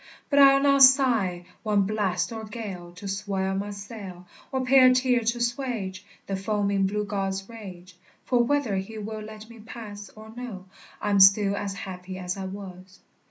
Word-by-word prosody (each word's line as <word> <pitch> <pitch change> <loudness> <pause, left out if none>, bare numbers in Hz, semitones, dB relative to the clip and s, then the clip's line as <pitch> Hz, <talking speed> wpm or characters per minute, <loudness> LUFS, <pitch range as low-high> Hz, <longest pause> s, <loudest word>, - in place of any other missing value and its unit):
But 285 - +4
I'll 275 0 +8
not 275 -1 +4
sigh 240 -10 +5 0.2
one 210 -2 +2
blast 195 -2 -1
or 225 -1 -6
gale 200 -6 -7
To 185 +3 -9
swell 195 -1 -2
my 200 +2 -3
sail, 200 -3 -9 0.3
Or 260 -1 -1
pay 265 +1 +6
a 255 -1 +8
tear 255 -1 +3
to 230 +1 -1
'suage 235 -7 -3 0.2
The 195 - -3
foaming 200 -1 0
blue 210 +1 -2
god's 195 -1 -3
rage; 185 -5 -11 0.3
For, 245 -2 +3
whether 245 -6 0
he 205 +4 -5
will 215 +1 -6
let 215 0 -10
me 230 0 -14
pass 210 -2 -9
Or 220 0 -12
no, 235 -7 -7 0.3
I'm 205 -1 +1
still 195 +1 +6
as 200 -1 -4
happy 185 -1 -7
as 180 -1 -4
I 195 -1 -5
was. 190 -1 -9
205 Hz, 175 wpm, -26 LUFS, 190-230 Hz, 0.3 s, I'll